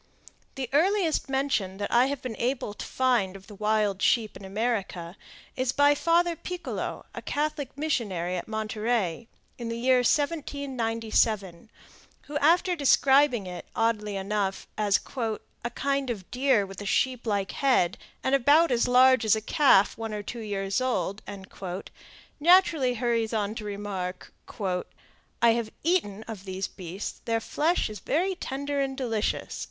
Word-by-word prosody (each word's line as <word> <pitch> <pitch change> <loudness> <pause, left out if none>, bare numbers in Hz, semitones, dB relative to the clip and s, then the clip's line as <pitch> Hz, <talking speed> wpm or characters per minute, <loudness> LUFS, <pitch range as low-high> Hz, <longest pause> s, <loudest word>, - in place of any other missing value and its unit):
The 265 -2 -3
earliest 340 -1 +2
mention 265 -9 0
that 205 0 -3
I 245 +2 +5
have 280 -1 -4
been 250 -3 -4
able 240 -3 -1
to - - -7
find 240 -8 +1
of 195 0 -12
the 210 - -12
wild 210 -1 0
sheep 225 -4 +2
in 195 - -10
America 195 -4 -2 0.4
is 255 -1 0
by 285 +1 +5
Father 335 +3 +2
Picolo, 360 +2 -5
a - - -6
Catholic 290 -2 -3
missionary 200 - -1
at 175 - -4
Monterey, 220 -2 -1 0.3
in 235 -1 -4
the 230 - -3
year 255 +2 +3
1797, 230 - 0 0.5
who, 295 - -9
after 350 +4 +3
describing 275 - +4
it, 180 -1 -7
oddly 215 -2 0
enough, 195 0 -2
as 205 -2 +2 0.6
"a 235 - -1
kind 275 +2 -1
of 200 -6 -5
deer 250 -5 +2
with 195 +1 -9
a - - -6
sheep 250 +2 0
like 200 -2 0
head, 250 -10 +2 0.3
and 265 - 0
about 285 +4 +5
as 235 -1 +2
large 255 +1 +6
as 220 -1 +4
a - - -1
calf 215 -3 +4
one 225 -1 -4
or 205 - -4
two 235 +4 -6
years 200 0 -2
old," 245 -5 -1 1.2
naturally 320 -6 +4
hurries 230 -1 0
on 210 -1 -1
to 225 - -6
remark: 200 -3 -5 1.1
"I 235 - +7
have 230 -1 -1
eaten 255 - 0
of 215 -4 -8
these 190 0 -3
beasts; 185 +2 -7
their 230 -1 +1
flesh 315 +9 0
is 210 -2 -7
very 360 - 0
tender 285 -4 -3
and 270 -1 -1
delicious." 225 -5 -2
230 Hz, 150 wpm, -27 LUFS, 205-275 Hz, 1.2 s, I